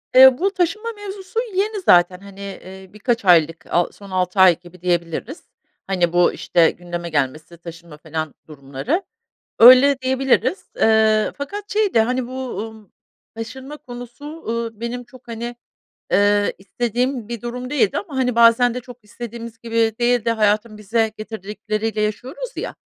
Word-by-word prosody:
Eee, 260 0 +9
bu 390 +6 +1
taşınma 385 +5 -1
mevzusu 400 0 -6
yeni 410 +2 0
zaten, 180 - +4
hani, 200 0 -9
iii, 190 0 -12
birkaç 230 +1 -1
aylık 165 -2 +4
a 175 0 +1
son 200 -1 -14
6 185 +1 -1
ay 180 -3 +6
gibi 175 0 -16
diyebiliriz. 175 - -2 0.4
Hani, 175 -3 0
bu, 175 0 +4
işte, 170 -2 +2
gündeme 175 -1 -6
gelmesi, 155 +3 -2
taşınma 170 -2 -11
falan 155 -1 -5
durumları. 150 - -3 0.6
Öyle 255 +3 +8
diyebiliriz. 265 +7 +1
Eee, 220 -1 +3
fakat 405 +9 -6
şey 420 -2 +1
de, 225 - +5
hani, 250 +2 -1
bu, 260 0 -5
ııı, 220 -2 -10 0.5
taşınma 265 +6 -7
konusu, 245 0 -10 0.2
ııı, 230 -1 -3
benim 240 +1 -4
çok, 255 +1 -18
hani, 235 +1 -5 0.6
eee, 205 0 +3
istediğim 240 +4 -2
bir 235 -2 -6
durum 250 +1 -5
değildi 245 -9 +1
ama, 325 -9 -6
hani, 250 -2 0
bazen 235 +1 +5
de 250 - -4
çok 245 -1 -14
istediğimiz 230 +1 -8
gibi 230 -1 0
değil 240 -1 +2
de 230 - +2
hayatın 215 0 +1
bize 220 +2 0
getirdikleriyle 215 0 -4
yaşıyoruz 250 - -4
ya. - - -5
225 Hz, 150 wpm, -20 LUFS, 190-255 Hz, 0.6 s, Eee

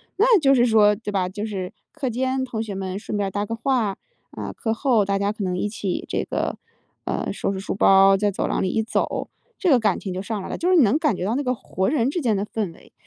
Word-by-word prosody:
那 445 +1 +5
就 275 -3 +4
是 240 - +4
说 210 -3 +5
对 210 0 -6
吧， 190 -2 0
就 205 +4 -5
是 190 -4 -5 0.2
课 275 -5 -3
间 260 +2 -1
同 225 -3 -3
学 210 -3 -6
们 190 0 -4
顺 210 0 -4
便 200 -1 0
搭 205 +2 -2
个 230 - -4
话， 230 -5 0 0.3
啊， - - -6
课 220 -1 -2
后 230 -3 +2
大 195 0 0
家 200 +1 0
可 210 - -5
能 180 -1 -1
一 210 - -1
起 200 -3 -3
这 - - -1
个 - - -2 0.5
呃， - - -2
收 - - -2
拾 190 - -4
书 195 - -4
包， 195 0 +6
在 205 +1 +1
走 - - -2
廊 - - -1
里 185 - 0
一 220 - +1
走， 220 - -2 0.3
这 370 - +1
个 255 -5 +5
感 210 -4 +1
情 190 - -5
就 185 - -3
上 210 -1 -4
来 - - -7
了， - - -4
就 355 - 0
是 370 - +5
你 300 - +7
能 220 +8 +3
感 300 - +1
觉 180 - -3
到 220 +5 0
那 285 - -1
个 250 0 0
活 190 -5 -2
人 255 -3 +1
之 340 +3 -2
间 220 -6 +1
的 200 - -1
氛 210 -6 -3
围。 - - -20
215 Hz, 295 characters per minute, -23 LUFS, 195-250 Hz, 0.5 s, 你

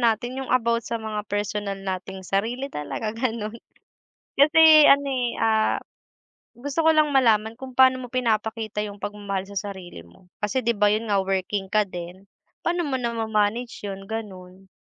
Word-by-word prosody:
natin 240 +2 0
yung 265 - -6
about 235 -2 +2
sa 230 - -1
mga 220 -1 -4
personal 205 -1 -2
nating 190 0 -6
sarili 235 +9 -2
talaga 180 +9 -4
ganun. 230 -1 -3 0.7
Kasi 310 +2 +7
ano 280 0 +5
eh, 250 -3 -1
ah, 220 -1 +2 0.8
gusto 285 +6 -3
ko 320 - +6
lang 310 -1 +3
malaman 225 -5 +2
kung 260 0 -9
paano 260 0 +4
mo - - -9
pinapakita 220 -3 -1
yung 205 0 -9
pagmamahal 200 -2 -4
sa 200 - -7
sarili 190 - -7
mo, 130 - -21
kasi 210 +5 -1
di 235 -1 +1
ba 205 0 +4
yun 220 +2 -1
nga, 200 - +3
working 195 +1 -1
ka 215 -1 +4
din, 180 +2 -8 0.4
paano 345 +1 +1
mo 265 -2 -1
nama-manage 225 0 -1
yun, 195 0 -7
ganun? 190 -4 -8
220 Hz, 160 wpm, -24 LUFS, 200-250 Hz, 0.8 s, Kasi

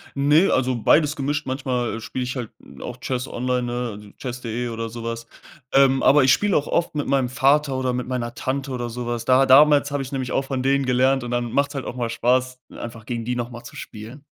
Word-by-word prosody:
Ne, 145 +6 +4
also, 130 0 +1
beides 150 +6 +3
gemischt. 145 +1 -2
Manchmal 125 -4 -2
spiele 125 +3 -4
ich 125 +2 -4
halt 120 -3 -5 0.3
auch 125 - -6
Chess 125 0 -3
online, 125 +1 -1
ne, 120 0 -2
also, 105 0 -11
Chess.de, 120 -1 -4
oder 115 0 -4
so 115 0 -8
was. 115 0 -4 0.5
Ähm, 135 -1 +4
aber 145 +1 +6
ich 130 - +5
spiele 205 -2 +2
auch 145 - +1
oft 170 - 0
mit 145 - -2
meinem 135 -2 +1
Vater, 140 +2 +2
oder 130 -1 -1
mit 125 0 -3
meiner 120 -2 -3
Tante, 135 +1 -3
oder 120 -2 -3
so 120 +1 -5
was. 120 -1 -3
Da 130 +1 +5
damals 145 +1 +6
habe 140 -1 -1
ich 130 - -9
nämlich 130 -3 -3
auch 135 - 0
von 135 -1 -3
denen 135 +1 +2
gelernt 130 +1 +2
und 120 - -5
dann 120 -1 -1
macht 140 +3 +1
es 145 - -11
halt 135 - -4
auch - - -5
mal 120 -2 -2
Spaß, 130 +2 +1 0.2
einfach 115 -1 -8
gegen 115 -2 -3
die 125 +1 -1
noch 120 0 -3
mal 120 -1 -10
zu - - -12
spielen. 115 +6 -9
130 Hz, 240 wpm, -22 LUFS, 120-135 Hz, 0.5 s, aber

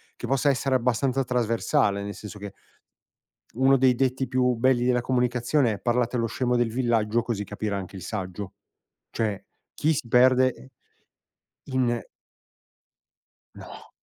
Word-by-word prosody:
che - - -7
possa 135 +2 +2
essere 135 0 +1
abbastanza 130 +2 +1
trasversale, 115 -3 0
nel 100 0 -5
senso 105 -1 -10
che 100 -1 -8 1.0
uno 135 +1 +4
dei 130 -1 +4
detti 130 0 0
più 125 -1 +1
belli 125 +1 +2
della 125 -1 +2
comunicazione 125 0 +1
è 100 - -7
"parlate 120 0 0
allo 115 0 0
scemo 125 +1 -1
del 120 -2 +1
villaggio 120 -2 +1
così 105 -4 -3
capirà 105 -2 -3
anche 95 0 -7
il - - -9
saggio." 95 -1 -5 0.6
Cioè 105 -3 -2 0.3
chi 155 +2 +1
si 130 - -4
perde 130 +1 +3 1.0
in 125 -3 0 1.6
No. - - -12
125 Hz, 135 wpm, -25 LUFS, 110-130 Hz, 1.6 s, uno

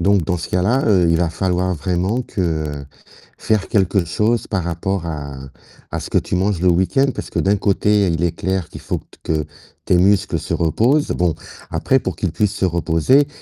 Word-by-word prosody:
donc 100 0 +3
dans 90 -2 0
ce 85 - -6
cas-là, 100 +9 +2
heu, 90 -5 +4
il 85 - +3
va 85 0 +1
falloir 90 +1 0
vraiment 90 - -1
que 80 -8 -3 0.5
faire 110 -3 0
quelque 95 -2 +1
chose 110 +7 0
par 95 -5 -1
rapport 85 +1 -2
à 70 -4 -5 0.5
à - - -2
ce - - -7
que - - +3
tu - - -3
manges 95 -1 0
le 95 - +2
week-end, 95 +11 +2
parce - - -6
que - - -1
d'un 100 +1 +2
côté, 100 0 +2
il 85 0 0
est 85 - +2
clair 95 0 -2
qu'il - - -10
faut - - -3 0.2
que 75 -2 -1 0.4
tes 90 - +3
muscles 100 -1 +3
se 80 +3 -4
reposent. 115 - +2
Bon, 90 -3 +1 0.4
après 135 - +2
pour 95 -6 -4
qu'ils 90 -2 -2
puissent 105 +3 0
se 100 - 0
reposer, 85 - +2
90 Hz, 195 wpm, -19 LUFS, 85-100 Hz, 0.5 s, heu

